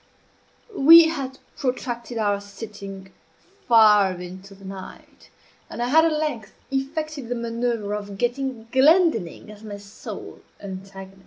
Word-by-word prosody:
We 325 +2 +8
had 270 -5 -5 0.2
protracted 245 -2 -3
our 205 -2 0
sitting 200 -2 -10 0.6
far 210 -4 +6
into 185 +2 -10
the 195 0 -15
night, 190 -1 -11 0.4
and - - -8
I 240 +1 -1
had 320 +4 +5
at 330 - +2
length 300 -8 -3 0.2
effected 280 -1 -3
the 245 - -1
manoeuvre 230 -3 -2
of 205 -1 -7
getting 245 0 -2
Glendinning 265 - +3
as 210 0 -14
my 205 -2 -7
sole 200 0 -10 0.2
antagonist. 195 0 -9
225 Hz, 130 wpm, -23 LUFS, 200-270 Hz, 0.6 s, We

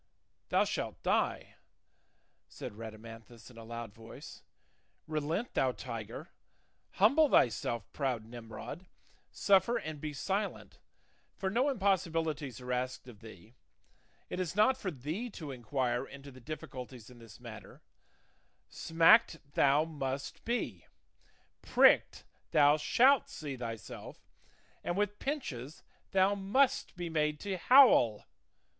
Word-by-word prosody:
'" - - -48
"Thou - - +4
shalt - - -4
die," - - 0 0.9
said - - -8
Rhadamanthus 115 +2 -11
in 120 - -17
a - - -9
loud 115 -2 -7
voice; 115 +1 -12 0.6
"relent, 160 - -2
thou 130 -1 +1
tiger; 120 - -7 0.6
humble 310 +1 +4
thyself, 120 - +2
proud 125 -6 -2
Nimrod; 115 +9 -9 0.4
suffer 200 +4 +3
and 155 -2 -6
be 155 - -3
silent, 195 +8 -3 0.6
for 190 -1 -2
no 250 +7 +2
impossibilities 165 - -1
are 125 0 -4
asked 130 +1 -3
of 115 -4 -12
thee; 110 -1 -14 0.7
it - - -5
is 180 -1 -3
not 215 +5 +4
for 195 - -4
thee 160 - -5
to 155 -9 -8
inquire 125 0 -2
into 140 0 -11
the 130 0 -14
difficulties 125 -4 -8
in 120 - -15
this 115 -3 -14
matter; - - -11 0.9
smacked 165 +3 +4 0.2
thou 145 +2 +4
must 140 -3 -5
be, 195 - -3 0.7
pricked - - +4 0.2
thou 145 -1 +5
shalt 255 - +4
see 145 -3 -6
thyself, 115 -4 -8 0.5
and 175 - -2
with 205 0 -1
pinches 155 - -5 0.3
thou 190 +1 +3
must 205 +8 +1
be 175 -1 -4
made 150 -2 0
to 200 -2 -3
howl. 180 - +6
145 Hz, 125 wpm, -32 LUFS, 120-190 Hz, 0.9 s, howl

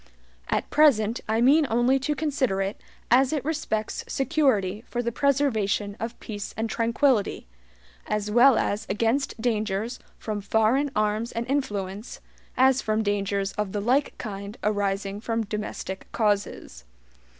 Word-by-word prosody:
At - - 0
present 235 -7 +4
I 220 +1 +2
mean 285 +4 +5
only 240 +3 +3
to 295 +3 -1
consider 270 -9 0
it 195 +1 -3 0.3
as 260 +2 +5
it 295 -4 -2
respects 220 -9 -2
security 255 - +1
for 240 0 -2
the 235 - -1
preservation 225 -7 +1
of 230 +1 -5
peace 205 -2 -6
and 225 +1 -1
tranquillity, 230 0 +1 0.6
as 210 0 -2
well 245 +3 +6
as 205 +1 -1
against 230 +4 0
dangers 220 0 -1 0.2
from 210 -2 -4
FOREIGN 220 +8 +2
ARMS 215 +2 0
AND 230 +1 -2
INFLUENCE, 210 -6 -3 0.4
as 260 0 +4
from 215 0 0
dangers 200 -1 -1
of 210 -2 -2
the 205 - -1
LIKE 255 +7 +1
KIND 200 -1 -6
arising 200 -1 -1
from 230 0 -1
domestic 205 -2 -5
causes. 205 - -1
220 Hz, 140 wpm, -25 LUFS, 205-260 Hz, 0.6 s, well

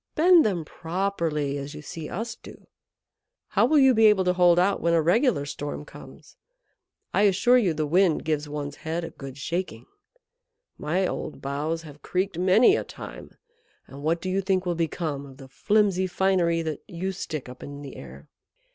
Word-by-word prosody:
Bend 345 +1 +6
them 180 -7 -1
properly, 165 -5 -2
as 140 +2 -7
you 150 - -9
see 155 +1 -7
us 225 +4 -4
do. - - -14 0.8
How - - +3
will 310 - +3
you 265 -2 +6
be 220 -1 +6
able 210 -3 +4
to 180 0 +2
hold 175 -1 +4
out 190 +3 +2
when 170 0 +2
a - - +4
regular 200 - +2
storm 145 +1 -6
comes? - - -14 0.8
I - - +3
assure 245 +7 +4
you 180 -9 +1
the 155 0 -1
Wind 175 +2 +2
gives 150 -1 -1
one's 145 -1 -5
head 165 +2 -4
a - - -6
good 135 -1 -10
shaking. 175 +6 -4 0.9
My 175 +6 -1
old 155 - -4
boughs 150 +4 -3
have 150 -2 -13
creaked 185 -1 -2
many 195 - +5
a - - -1
time; - - -11 0.5
and 140 +1 -11
what 165 +3 0
do 185 - -3
you 195 +1 +1
think 190 -1 0
will 175 - 0
become 160 -3 -2
of 135 -1 -14
the 135 -2 -12
flimsy 195 +6 +1
finery 175 -2 +1
that 155 -3 -4
you 185 0 -4
stick 155 -7 -5
up 125 0 -11
in 145 0 -8
the 140 - -9
air?" 70 +1 -11
170 Hz, 185 wpm, -25 LUFS, 150-190 Hz, 0.9 s, Bend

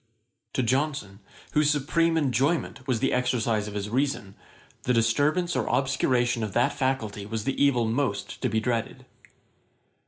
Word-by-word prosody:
To 130 - 0
Johnson, 130 -6 -1 0.3
whose 150 -1 +3
supreme 165 +3 +2
enjoyment 140 -1 0
was 120 -4 0
the - - +1
exercise 115 -4 0
of 105 - -7
his 100 0 -2
reason, 130 -6 -1 0.5
the 125 - 0
disturbance 145 +10 +2
or - - 0
obscuration 125 -3 +1
of 105 -3 -3
that 125 +4 +2
faculty 115 -7 -2
was 110 0 -3
the 135 +4 0
evil 125 -5 +3
most 110 -3 -2
to 130 - +1
be 110 0 +1
dreaded. 115 0 -2
125 Hz, 150 wpm, -26 LUFS, 110-140 Hz, 0.5 s, whose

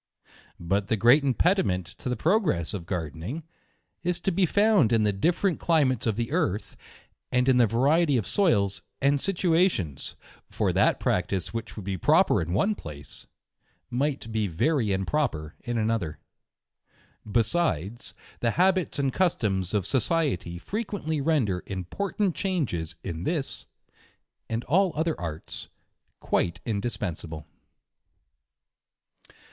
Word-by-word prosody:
But 95 +4 0
the 110 - +1
great 120 +8 +6
impediment 125 - +2
to - - -4
the 125 - 0
progress 155 - +1
of 90 -5 -5
Gardening 90 - -4 0.6
is 175 0 -1
to 195 - +1
be 185 0 +2
found 200 - +4
in 115 -2 +3
the 105 -1 +2
different 170 - +1
climates 135 -8 +2
of 110 - +1
the 115 +2 -2
earth, 150 - -1 0.6
and 125 +1 +2
in 130 -2 +5
the 120 -2 +5
variety 140 +6 +3
of 110 - -1
soils 100 - +2 0.2
and 140 0 +2
situations: 170 - 0 0.3
For - - 0
that - - +3
practice 95 0 -1
which 115 -1 -5
would 105 - -7
be 95 -2 -3
proper - - +4
in 85 +1 -3
one 165 - +2
place, 75 - -9 0.6
might 135 -2 -1
be 110 -2 0
very 110 - +1
improper 95 - -1
in 120 -2 -2
another. 110 -8 -1 1.1
Besides, 115 - 0 0.2
the 115 - +1
habits 185 0 +2
and 135 -2 0
customs 105 - 0
of 105 -4 0
society 130 - 0
fre 200 - -4
quently 160 -10 -3
render 120 - +1
important 185 - -2
changes 145 - -2
in 85 -4 -4
this, 150 - -2 0.8
and 115 +1 -2
all 185 +1 +2
other 160 +1 0
arts, 80 -2 -5 0.5
quite 85 +2 0
indispensable. 95 -8 -3
120 Hz, 130 wpm, -27 LUFS, -, 1.1 s, great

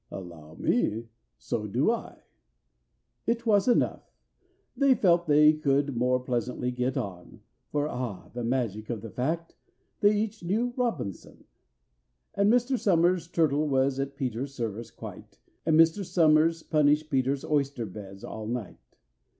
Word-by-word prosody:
"Allow 85 -4 -10
me, 115 +7 0 0.3
so 105 -2 -3
do 125 - +2
I." 235 - -6 1.0
It 235 +1 0
was 205 -2 +3
enough: 245 - +1 0.6
they 270 0 +4
felt 175 -5 +3
they 150 +1 +6
could 140 -2 0
more 125 +2 +2
pleasantly 125 0 -2
get 125 +1 -1
on, 90 -3 -6 0.3
For 145 0 0
(ah, 125 -8 -5
the 120 0 -4
magic 115 -4 -2
of 115 -4 -3
the 115 -1 -8
fact!) 165 +6 -3 0.4
they 205 0 +4
each 215 -1 -3
knew 225 +8 0
ROBINSON! 165 - -3 0.9
And 200 +1 +3
Mr. 245 +1 +2
SOMERS' 175 -2 +2
turtle 155 -3 +1
was 135 -1 +1
at 140 0 -3
PETER'S 130 +1 -3
service 115 -2 -4
quite, - - -11 0.3
And 160 -1 +4
Mr. 165 +5 +4
SOMERS 165 -1 +3
punished 150 0 +2
PETER'S 135 0 0
oyster 140 -5 0
beds 95 -1 -10
all 110 -1 -6
night. 120 -3 -7
140 Hz, 140 wpm, -28 LUFS, 120-170 Hz, 1.0 s, they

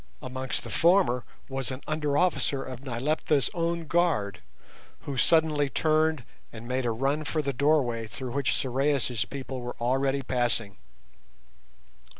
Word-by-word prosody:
Amongst 130 0 -3
the 115 - -7
former 165 - +3 0.2
was 135 -2 -3
an 130 +1 -5
under 150 -2 0
officer 155 -6 +1
of 130 -2 -7
Nyleptha's 140 +3 0
own 170 -1 -1
guard, 150 - +1 0.6
who 140 - -5
suddenly 150 0 +3
turned 155 -1 +2 0.3
and 115 +1 -9
made 130 0 -1
a - - +1
run 135 +6 0
for 155 +1 -1
the 140 -1 -1
doorway 125 -5 +2
through 125 +3 -6
which 140 +1 +1
Sorais' 130 -3 0
people 135 -2 -5
were 125 0 -5
already 135 +3 +1
passing. 120 -6 0
135 Hz, 140 wpm, -28 LUFS, 125-155 Hz, 0.6 s, former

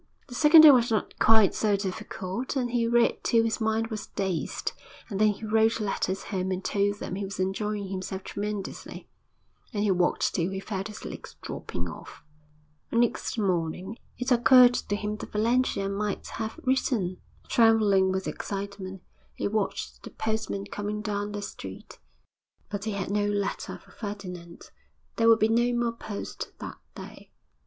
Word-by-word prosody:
The - - -9
second 305 +5 +8
day 310 -2 +11
was 245 -3 +4
not 220 -2 -1
quite 220 -3 +6
so 210 -2 +2
difficult, 195 +4 -4
and 245 -3 0
he 235 -1 +1
read 235 0 +2
till 230 -1 +4
his 225 +1 -1
mind 220 +1 +1
was 215 -2 -5
dazed, 190 -4 -2 0.4
and 200 +1 -1
then 215 - +6
he 210 +1 -1
wrote 220 +1 +3
letters 195 -2 -1
home 190 -2 -2
and 185 0 -3
told 200 0 +1
them 180 - -5
he 200 +2 -3
was 195 -1 -6
enjoying 200 +1 -1
himself 190 0 -4
tremendously, 205 -1 -5 0.6
and 210 -4 -1
he 205 - +3
walked 180 -1 +1
till 170 +1 0
he 190 0 -4
felt 195 0 -4
his 210 - -9
legs - - -8
dropping 85 0 -5
off. 85 - -10 0.7
Next 235 0 +1
morning 185 0 -1 0.2
it 250 +1 -2
occurred 245 +1 +7
to 205 - -1
him 210 0 -3
that - - -8
Valentia 225 -2 +1
might 200 +1 -2
have 220 +7 -5
written. 245 -8 +1 0.3
Trembling 210 -5 +4
with 190 0 -2
excitement, 195 -2 -5 0.3
he - - -1
watched 210 -1 -2
the - - -9
postman 220 -2 -3
coming 210 +1 -4
down 205 -1 -2
the 205 0 -4
street - - -9 0.7
but 205 0 -3
he 215 - -1
had 195 -1 -3
no 205 0 +1
letter 205 -1 -2
for - - -20
Ferdinand. 180 -5 -8 0.5
There 230 0 +5
would 225 - +7
be 215 - +3
no 240 +1 +2
more 235 -1 0
post 215 -3 -6
that - - -8 0.2
day. - - -10
210 Hz, 165 wpm, -27 LUFS, 195-225 Hz, 0.7 s, day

